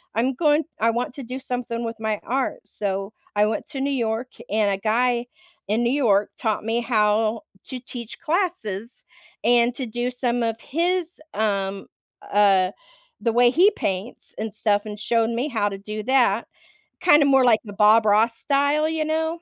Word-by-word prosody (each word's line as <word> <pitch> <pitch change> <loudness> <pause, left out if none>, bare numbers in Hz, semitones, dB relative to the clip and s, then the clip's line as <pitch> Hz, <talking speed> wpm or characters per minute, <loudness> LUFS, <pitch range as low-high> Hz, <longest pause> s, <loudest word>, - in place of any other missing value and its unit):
I'm 245 +4 +1
going 300 +2 +3 0.2
I 230 +1 +3
want 240 +2 -3
to 275 - -7
do 255 +2 -6
something 245 -3 -4
with 230 -1 -5
my 220 -1 -1
art. 260 +2 -2
So, 195 0 -3 0.2
I 210 0 +4
went 215 - -2
to 270 -3 -4
New 280 +1 0
York, 235 -1 -1 0.2
and 210 -1 +2
a 195 - 0
guy 235 +4 +1 0.4
in 215 +4 +1
New 240 - +2
York 215 -8 +2
taught 220 -2 -1
me 225 +2 0
how 215 -1 +1 0.2
to 255 - -6
teach 240 -2 -9
classes 300 - -3 0.4
and 240 +1 +4
to 260 - -4
do 240 +3 -2
some 245 -1 -1
of 225 0 -2
his, 350 +3 -1
um, 200 -2 -1 0.4
uh, 195 -2 +4 0.5
the 230 +1 0
way 240 +1 +5
he 365 +9 +5
paints 195 - -4
and 220 -1 -4
stuff 205 -1 +1
and 210 -1 -7
showed 230 0 +1
me 240 +5 -1
how 220 -6 0
to 195 - -6
do 210 +2 -6
that. 235 -3 +2 0.5
Kinda 300 -5 +6
more 270 -2 +5
like 225 -3 +5
the 205 - -8
Bob 215 +2 +5
Ross 220 +3 +3
style, 285 +2 +1
you 320 -1 -1
know? 320 +2 -1
230 Hz, 180 wpm, -23 LUFS, 215-265 Hz, 0.5 s, Kinda